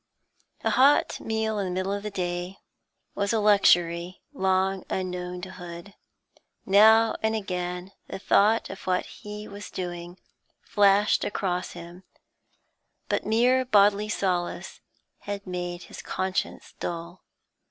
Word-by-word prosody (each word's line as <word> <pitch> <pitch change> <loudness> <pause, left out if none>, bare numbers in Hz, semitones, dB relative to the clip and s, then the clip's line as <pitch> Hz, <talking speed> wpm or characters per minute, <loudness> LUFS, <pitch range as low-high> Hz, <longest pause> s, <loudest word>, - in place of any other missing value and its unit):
A - - +1
hot 275 +3 +4
meal 220 -1 -2
in 200 - -1
the - - -3
middle 185 +2 -1
of 200 - -3
the 210 - -4
day 180 -1 -4 0.6
was 200 0 -1
a 225 - +2
luxury 175 -4 +3
long 190 -4 +1
unknown 180 -1 -4
to 185 +1 -7
Hood. 175 +2 -10 0.7
Now 220 +3 +6
and 220 0 +1
again 180 -2 -4 0.2
the - - -6
thought 210 +3 +3
of - - -10
what 180 0 +1
he 210 0 -9
was 200 0 -9
doing 175 0 -6 0.5
flashed 205 -1 +3
across 180 -3 -2
him, 175 +1 -11 1.1
but - - -1
mere 245 +4 +3
bodily 210 -3 +3
solace 180 -4 -2 0.7
made 175 -1 -5
his - - -10
conscience 185 0 -3
dull. 170 +1 -5
190 Hz, 125 wpm, -26 LUFS, 180-210 Hz, 1.1 s, Now